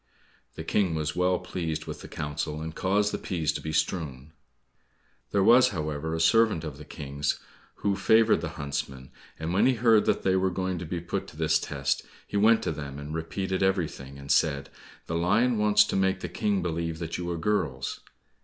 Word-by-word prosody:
The 80 Hz, -, -6 dB
King 90 Hz, 0 st, +1 dB
was 75 Hz, -1 st, -2 dB
well 90 Hz, 0 st, +2 dB
pleased 85 Hz, -3 st, -4 dB
with -, -, -7 dB
the -, -, -9 dB
counsel, 75 Hz, +1 st, -4 dB
and 80 Hz, 0 st, -5 dB
caused 100 Hz, +4 st, +1 dB
the -, -, -2 dB
peas 85 Hz, -6 st, -1 dB
to -, -, -4 dB
be 80 Hz, -, -4 dB
strewn. 75 Hz, -3 st, -2 dB, 1.0 s
There 100 Hz, -1 st, +2 dB
was, 120 Hz, +4 st, +7 dB
however, 80 Hz, -2 st, -3 dB
a -, -, -2 dB
servant 105 Hz, 0 st, +4 dB
of 75 Hz, -3 st, -6 dB
the 75 Hz, -, -10 dB
King's 70 Hz, -1 st, -3 dB, 0.5 s
who 100 Hz, -1 st, +3 dB
favored 110 Hz, +3 st, +4 dB
the -, -, -3 dB
huntsmen, 70 Hz, -2 st, -4 dB, 0.3 s
and 80 Hz, +2 st, -3 dB
when 95 Hz, -, +4 dB
he 130 Hz, -, +3 dB
heard 115 Hz, -3 st, +4 dB
that -, -, +1 dB
they 95 Hz, -1 st, +3 dB
were 95 Hz, 0 st, +2 dB
going 95 Hz, -1 st, -2 dB
to 85 Hz, -, -6 dB
be 85 Hz, +1 st, -3 dB
put 85 Hz, -, -3 dB
to 75 Hz, -, -13 dB
this 80 Hz, -1 st, +2 dB
test 70 Hz, -1 st, -1 dB, 0.2 s
he -, -, -8 dB
went 110 Hz, +3 st, +5 dB
to -, -, 0 dB
them 70 Hz, -2 st, -6 dB
and 70 Hz, +2 st, -7 dB
repeated 95 Hz, +4 st, -2 dB
everything, 80 Hz, -8 st, -1 dB
and 70 Hz, 0 st, -5 dB
said, 70 Hz, -3 st, +2 dB, 0.3 s
"The -, -, -5 dB
lion 105 Hz, +8 st, +2 dB
wants 105 Hz, 0 st, +5 dB
to -, -, -3 dB
make 95 Hz, 0 st, +1 dB
the -, -, -4 dB
King 100 Hz, -3 st, 0 dB
believe 85 Hz, -1 st, -2 dB
that 85 Hz, +1 st, -4 dB
you 85 Hz, -1 st, -3 dB
are 85 Hz, -, -2 dB
girls." 105 Hz, +5 st, -1 dB
85 Hz, 200 wpm, -27 LUFS, 75-95 Hz, 1.0 s, was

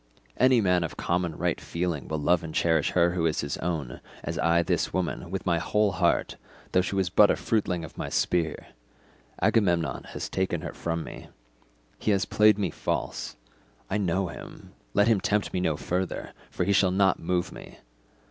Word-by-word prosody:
Any 130 Hz, -1 st, +5 dB
man 90 Hz, -3 st, +2 dB
of 75 Hz, -6 st, -5 dB
common 85 Hz, -2 st, -1 dB
right -, -, -1 dB
feeling 85 Hz, -4 st, -3 dB
will 80 Hz, -, -2 dB
love 85 Hz, +3 st, +2 dB
and 80 Hz, -1 st, -7 dB
cherish 80 Hz, -3 st, +2 dB
her 85 Hz, -1 st, +4 dB
who 85 Hz, -2 st, +1 dB
is 80 Hz, -, 0 dB
his 70 Hz, -1 st, -3 dB
own, 80 Hz, -8 st, -3 dB, 0.2 s
as -, -, -4 dB
I 85 Hz, +1 st, +3 dB
this 85 Hz, -2 st, 0 dB
woman, 90 Hz, -1 st, -2 dB
with 95 Hz, +1 st, -4 dB
my 85 Hz, -3 st, +2 dB
whole 105 Hz, +4 st, +1 dB
heart, 85 Hz, -1 st, +1 dB, 0.3 s
though 90 Hz, -, +4 dB
she 95 Hz, -, -3 dB
was 95 Hz, -3 st, 0 dB
but 105 Hz, +2 st, +6 dB
a -, -, +3 dB
fruitling 90 Hz, -6 st, -1 dB
of -, -, -13 dB
my -, -, -3 dB
spear. 80 Hz, -4 st, 0 dB, 0.7 s
Agamemnon 85 Hz, -, +2 dB
has -, -, -5 dB
taken 95 Hz, -3 st, -1 dB
her -, -, -6 dB
from 85 Hz, -1 st, -3 dB
me; -, -, -9 dB, 0.7 s
he -, -, -1 dB
has 100 Hz, -2 st, +2 dB
played 105 Hz, -1 st, +4 dB
me 95 Hz, -6 st, -1 dB
false; -, -, -3 dB, 0.6 s
I 105 Hz, -, +1 dB
know 95 Hz, -1 st, 0 dB
him; -, -, -11 dB, 0.2 s
let 105 Hz, -, +4 dB
him 110 Hz, -4 st, +3 dB
tempt 105 Hz, 0 st, 0 dB
me 90 Hz, -, 0 dB
no 80 Hz, -4 st, 0 dB
further, 90 Hz, +3 st, -3 dB, 0.2 s
for -, -, -2 dB
he 100 Hz, -, +2 dB
shall 95 Hz, -1 st, +4 dB
not 95 Hz, 0 st, +2 dB
move 90 Hz, +1 st, -1 dB
me. -, -, -11 dB
90 Hz, 190 wpm, -27 LUFS, 85-95 Hz, 0.7 s, but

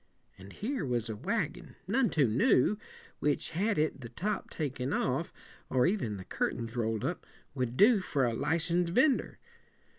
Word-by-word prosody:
And 95 Hz, +1 st, -11 dB
here 245 Hz, -, -3 dB
was 120 Hz, -4 st, -1 dB
a 110 Hz, -, -3 dB
wagon, -, -, -3 dB
none 235 Hz, +4 st, +2 dB
too 145 Hz, -5 st, +3 dB
new, 130 Hz, -, +3 dB, 0.4 s
which 150 Hz, -, 0 dB
had 200 Hz, +5 st, 0 dB
it 150 Hz, -2 st, 0 dB
the 115 Hz, -, -7 dB
top 200 Hz, -, -3 dB
taken 135 Hz, -3 st, -3 dB
off, 135 Hz, +6 st, 0 dB, 0.4 s
or 130 Hz, -1 st, +3 dB
even 170 Hz, -, 0 dB
the 95 Hz, -, -9 dB
curtains 115 Hz, 0 st, -2 dB
roll 115 Hz, -2 st, 0 dB
ed 110 Hz, -, -4 dB
up, -, -, -2 dB, 0.3 s
would 125 Hz, -2 st, -2 dB
do 215 Hz, +1 st, +6 dB
for 145 Hz, -8 st, 0 dB
a 120 Hz, -, 0 dB
li 160 Hz, +7 st, +1 dB
cen 170 Hz, +1 st, +1 dB
sed 170 Hz, -, -4 dB
vender. 265 Hz, +1 st, +3 dB
145 Hz, 180 wpm, -31 LUFS, 120-190 Hz, 0.4 s, do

